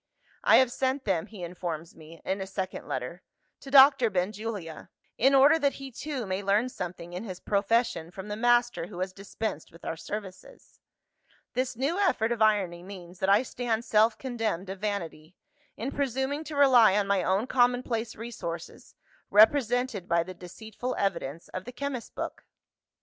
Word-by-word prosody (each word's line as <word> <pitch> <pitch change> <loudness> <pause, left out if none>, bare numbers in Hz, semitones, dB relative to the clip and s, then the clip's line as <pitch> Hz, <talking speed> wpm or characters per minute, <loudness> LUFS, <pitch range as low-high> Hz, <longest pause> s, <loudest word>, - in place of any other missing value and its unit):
'I - - +7
have 260 -2 +5
sent 265 +2 -1
them, 185 -6 0
(he 205 -5 -10
informs 170 -2 -5
me, 160 +1 -14
in 195 +1 -1
a 190 - -4
second 190 -1 -5
letter) 130 +8 -4 0.4
to 275 - -11
Doctor 270 -3 +7
Benjulia; 195 -2 -4 0.3
in 270 +4 +4
order 285 +4 +6
that 280 -2 +2
he 275 -1 -8
too 270 -1 -4
may 190 0 -2
learn 205 +5 +2
something 175 -5 -7
in 180 +4 -5
his 185 -5 -7
profession 200 -4 0
from 190 +3 -9
the 210 - -3
master 240 -4 +2
who 180 - -10
has 185 +1 -3
dispensed 195 -3 -5
with 165 - -15
our - - -2
services.' 195 +2 -9 0.7
This 255 0 -1
new 280 - -1
effort 240 - +2
of 235 -2 -2
irony 195 -5 +2
means 180 -1 -11
that 190 - +1
I 205 +5 +5
stand 235 -2 -2
self 220 0 +3
condemned 220 -8 -3
of 195 - -7
vanity, 180 -5 -4 0.4
in 245 +5 -3
presuming 275 +2 -1
to 305 - -6
rely 250 -8 +6
on 205 - +2
my 200 -1 +2
own 190 +5 +1
commonplace 245 -3 +1
resources 190 -7 -7 0.3
represented 235 -2 +3
by 170 0 +3
the 185 +2 -8
deceitful 220 +7 -6
evidence 165 -5 -2
of 185 - -6
the 250 - -7
chemist's 260 -1 -4
book! - - -6
210 Hz, 170 wpm, -28 LUFS, 185-245 Hz, 0.7 s, I